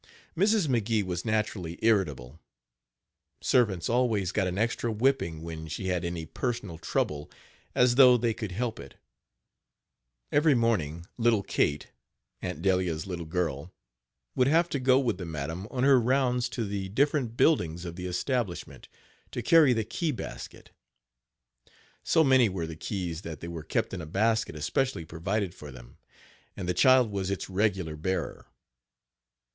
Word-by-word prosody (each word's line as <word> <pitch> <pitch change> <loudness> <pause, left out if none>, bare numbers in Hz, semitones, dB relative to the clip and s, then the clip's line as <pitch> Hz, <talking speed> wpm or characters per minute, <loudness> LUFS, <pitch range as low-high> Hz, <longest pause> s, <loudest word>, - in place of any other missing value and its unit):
Mrs. 200 0 +3
McGee 115 -4 +1
was 90 -2 -4
naturally 105 -6 -2
irritable. 80 - +1 1.0
Servants 100 -9 +2
always 115 -6 +1
got 100 -3 0
an 90 +1 -3
extra 115 +2 0
whipping 110 -9 0
when 80 -1 -7
she 95 +5 -4
had 90 -1 -1
any 85 -2 -4
personal 105 -3 -4
trouble, 75 -2 -2 0.5
as 125 -1 +4
though 125 -1 +7
they 115 -1 0
could 110 -3 -5
help 115 +4 -3
it. - - -11 1.4
Every 150 -1 +4
morning 85 -9 0
little 115 -3 +3
Kate, 75 -5 -1 0.5
Aunt 80 - -5
Delia's 90 -5 +1
little 85 -4 -5
girl, 80 -2 -2 0.6
would 125 - +2
have 165 +4 +3
to 140 - -2
go 130 0 +4
with 120 -8 -1
the 90 - -5
madam 80 +5 -5
on 125 -1 -2
her 135 -2 +6
rounds 125 0 +1
to 120 -2 -3
the 100 -1 -4
different 130 0 0
buildings 90 - +2
of 85 -1 -6
the 90 0 -5
establishment, 95 - -3 0.4
to 120 - -5
carry 155 +1 +6
the 115 -2 +1
key 160 +8 -2
basket. 125 - -8 1.3
So 160 - +4
many 130 -5 +5
were 90 -3 -3
the 80 0 -7
keys 85 -1 -4
that 80 -3 -7
they 85 - -7
were 85 -1 -6
kept 75 - -2
in 90 - -4
a 80 - -8
basket 110 +5 0
especially 85 - -1
provided 90 +4 -2
for 75 -5 -10
them, - - -14 0.6
and 90 - -5
the 90 - +1
child 125 +5 +5
was 100 -1 -2
its 100 0 -4
regular 95 -5 0
bearer. 95 +5 -3
100 Hz, 155 wpm, -28 LUFS, 85-125 Hz, 1.4 s, though